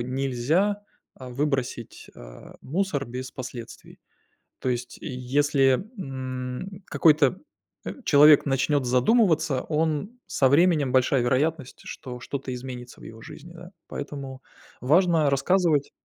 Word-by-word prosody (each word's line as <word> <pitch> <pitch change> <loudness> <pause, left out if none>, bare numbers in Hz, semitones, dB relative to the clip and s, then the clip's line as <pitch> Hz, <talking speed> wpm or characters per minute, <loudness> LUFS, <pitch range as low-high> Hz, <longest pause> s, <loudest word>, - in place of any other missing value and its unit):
нельзя, 135 +11 0 0.3
а, 130 -1 -10
выбросить, 135 -3 -3
а, - - -13
мусор 160 -2 -2
без 130 +1 -7
последствий. 120 -2 -9 0.6
То - - -5
есть, 125 0 -3
если, 135 +3 +1
м, 130 +5 -6
какой-то, 150 +1 +3 0.5
э, - - -4
человек 150 0 +6
начнёт 135 0 +1
задумываться, 155 - +2
он 160 +9 -2
со 135 -2 +2
временем 150 -3 +3
большая 130 0 +3
вероятность, 135 +3 -1
что 125 -1 -8
что-то 135 +1 -5
изменится 125 -1 -8
в - - -15
его 110 0 -11
жизни, 170 +8 -12
да. 175 +2 -12 0.2
Поэтому 140 -2 -7 0.4
важно 160 +1 +3
рассказывать. 150 +1 +2
135 Hz, 115 wpm, -25 LUFS, 125-160 Hz, 0.6 s, человек